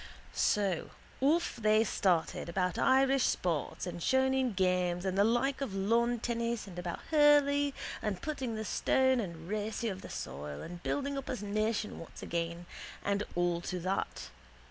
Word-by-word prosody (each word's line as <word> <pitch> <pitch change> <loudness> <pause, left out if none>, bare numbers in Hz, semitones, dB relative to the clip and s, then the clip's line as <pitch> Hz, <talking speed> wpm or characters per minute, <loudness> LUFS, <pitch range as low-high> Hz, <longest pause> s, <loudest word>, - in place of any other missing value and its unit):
So 195 -5 +1 0.3
off 310 +3 +2
they 215 -1 +4
started 175 -6 0
about 180 0 0
Irish 270 0 +4
sports 170 -3 -1
and 175 -1 -5
shoneen 265 -2 +2
games 180 -1 +1
the 195 +1 +2
like 240 +5 +1
of 225 -8 -3
lawn 230 +5 +2
tennis 235 0 -2
and 180 -3 -8
about 175 -1 -4
hurley 285 -2 +5 0.3
and 200 -4 -2
putting 265 -5 -3
the 220 0 -4
stone 260 +3 +2
and 170 -6 -5
racy 215 +3 -2
of 190 -1 -5
the - - -9
soil 70 +1 -6
and 175 0 -8
building 280 +4 -1
up 270 - -9
a 230 -6 -3
nation 215 +1 -1
once 165 - -10
again 170 +1 -3 0.4
and 200 0 0
all 175 -1 +1
to 180 +1 -3
that. 185 +3 -2
210 Hz, 155 wpm, -32 LUFS, 180-260 Hz, 0.4 s, hurley